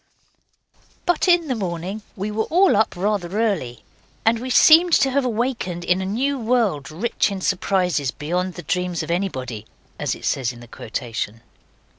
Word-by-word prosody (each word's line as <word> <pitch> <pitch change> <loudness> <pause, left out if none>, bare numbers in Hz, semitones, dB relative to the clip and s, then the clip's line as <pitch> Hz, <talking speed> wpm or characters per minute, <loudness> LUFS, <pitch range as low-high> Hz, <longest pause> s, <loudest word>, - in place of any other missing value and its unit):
But 350 +1 +1
in 345 -2 +4
the 260 - 0
morning 190 -1 -4
we 205 +2 -3
were 220 +1 -1
all 365 - +4
up 220 -1 +2
rather 195 0 -1
early, 175 - -1 0.4
and 225 +1 +3
we 255 +2 -5
seemed 330 +6 +6
to 270 - +4
have 280 +1 +1
awakened 230 -7 -2
in 180 +2 +1
a 190 - -3
new 265 +7 -1
world 220 - 0
rich 205 +10 0
in 200 -1 -4
surprises 180 -6 0
beyond 175 +7 -3
the 175 - -8
dreams 180 -1 -1
of - - -4
anybody, 130 - -3 0.3
as - - -1
it - - -10
says 130 -2 0
in 120 - -13
the 120 - -12
quotation. 115 -1 -5
195 Hz, 170 wpm, -22 LUFS, 170-235 Hz, 0.4 s, seemed